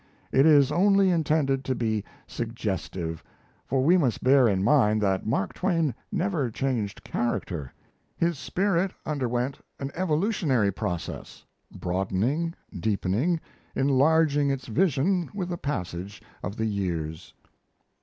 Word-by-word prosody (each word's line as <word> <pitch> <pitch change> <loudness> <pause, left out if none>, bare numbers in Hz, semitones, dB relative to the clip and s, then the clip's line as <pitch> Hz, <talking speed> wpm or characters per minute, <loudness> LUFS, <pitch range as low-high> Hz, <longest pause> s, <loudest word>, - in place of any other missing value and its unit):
It 135 +3 +5
is 145 -3 +6
only 195 +3 +4
intended 150 -5 +1
to 130 - 0
be 110 -4 -1 0.2
suggestive; 95 -7 -4 0.4
for 130 0 +1
we 175 +6 +5
must 130 -8 0
bear 130 -1 +6
in 95 -3 +1
mind 110 -4 +4
that 95 0 0
Mark 95 -3 0
Twain 165 -7 +1 0.2
never 175 - 0
changed 115 -4 -2
character. 85 - -2 0.5
His 170 -4 0
spirit 190 +2 0
underwent 130 -2 -1 0.2
an 135 0 -4
evolutionary 160 - +1
process 90 -2 -5 0.3
broadening, 100 - -1 0.2
deepening, 110 - 0 0.4
enlarging 145 +2 +3
its 135 -2 -2
vision 170 - +1
with 180 -3 -3
the 175 - -3
passage 95 - -4 0.2
of 100 +4 -5
the 110 - 0
years. 85 -6 -3
135 Hz, 120 wpm, -26 LUFS, 105-165 Hz, 0.5 s, is